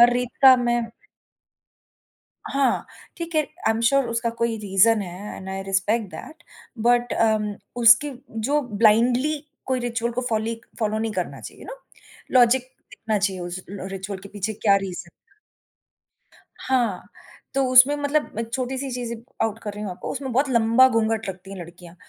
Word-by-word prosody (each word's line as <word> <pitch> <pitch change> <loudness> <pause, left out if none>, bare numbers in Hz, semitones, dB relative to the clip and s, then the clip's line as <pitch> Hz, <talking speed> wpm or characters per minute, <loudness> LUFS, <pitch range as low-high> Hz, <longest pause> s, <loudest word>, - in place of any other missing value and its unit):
हर 240 0 +7
रीत 245 0 -1
का 260 -1 +9
मैं 240 -1 0 1.6
हाँ, 275 -1 0 0.3
ठीक 335 -1 -6
है। 310 - +4 0.3
आई - - +4
एम 225 - -2
श्योर 275 -1 +2
उसका 230 0 -1
कोई 235 -1 +1
रीज़न 210 +2 +3
है 185 +3 -8
and 190 - -9
I 195 0 -4
respect 195 +3 0
that, 320 +2 -10 0.4
but 240 +2 +2
um, 215 -2 +1 0.2
उसकी 240 +5 +6 0.4
जो 295 +1 +3 0.2
ब्लाइंडली 245 +7 +4 0.3
कोई 260 -1 0
रिचुअल 235 -1 -2
को 250 - -2
फोलीक 225 +1 -2
फॉलो 215 -1 0
नहीं 220 -1 -2
करना - - -4
चाहिए - - -11
यू - - -11
नो? - - -8 0.5
लॉजिक 250 0 +5 0.3
देखना 220 -2 -2
चाहिए 195 -2 -1
उस 175 +1 -6
ल 195 -1 -6
रिचुअल 195 +1 -5
के 200 - -11
पीछे 205 +1 -3
क्या 200 -3 +5
रीज़न 185 -3 -5
था। 400 - -36 1.2
हाँ, 255 -3 0 0.5
तो 275 0 +2
उसमें 255 +3 +8
मतलब 290 -4 -1
एक 230 0 -4
छोटी-सी 265 +1 -3
चीजें 245 -2 -4 0.3
आउट 225 0 -1
कर 210 -2 -5
रही 210 - -7
हूँ 205 - -4
आपको, 180 - -6
उसमें 265 -2 -5
बहुत 270 +4 +2
लंबा 235 +2 +5
घूंघट 225 -2 0
लगती 190 0 -8
है - - -7
लड़कियाँ, 175 0 -13
230 Hz, 170 wpm, -23 LUFS, 205-255 Hz, 1.6 s, का